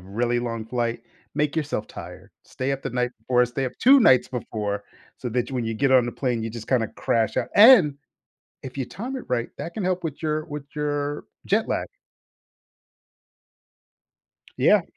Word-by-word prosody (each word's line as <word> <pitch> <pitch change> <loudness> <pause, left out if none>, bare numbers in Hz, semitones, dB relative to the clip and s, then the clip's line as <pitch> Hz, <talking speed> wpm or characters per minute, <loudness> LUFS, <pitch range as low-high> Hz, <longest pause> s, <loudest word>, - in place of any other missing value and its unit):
really 120 +6 -1
long 115 -2 -3
flight, 120 0 -2 0.3
make 150 0 0
yourself 145 -8 -2
tired, - - -10
stay 130 +1 -3
up 135 0 -4
the - - -3
night 125 0 0
before, 125 +2 +2
stay 125 +2 -3
up 125 - -5
2 270 +2 +7
nights 130 - +5
before, 105 -4 -4 0.3
so 125 - -4
that 120 +2 -1
when 125 -3 -2
you 115 0 -2
get 135 +4 +2
on 125 -2 +5
the 120 - -4
plane, 125 -4 -1
you 115 - -3
just 115 0 -9
kinda 120 -4 +2
crash 110 -1 -1
ou - - +2
and 205 - +8 0.7
if 130 +1 -8
you 135 - 0
time 225 - -6
it 255 - -7
right, 120 -1 -1
that 170 - -6
can 210 - -3
help 185 -1 -1
with 155 -1 -5
your 155 0 -1
with 150 -3 -6
your 145 -1 -2 0.2
jet 215 +3 +1
lag. - - -1 2.7
Yeah. - - +5
130 Hz, 180 wpm, -24 LUFS, 120-150 Hz, 2.7 s, and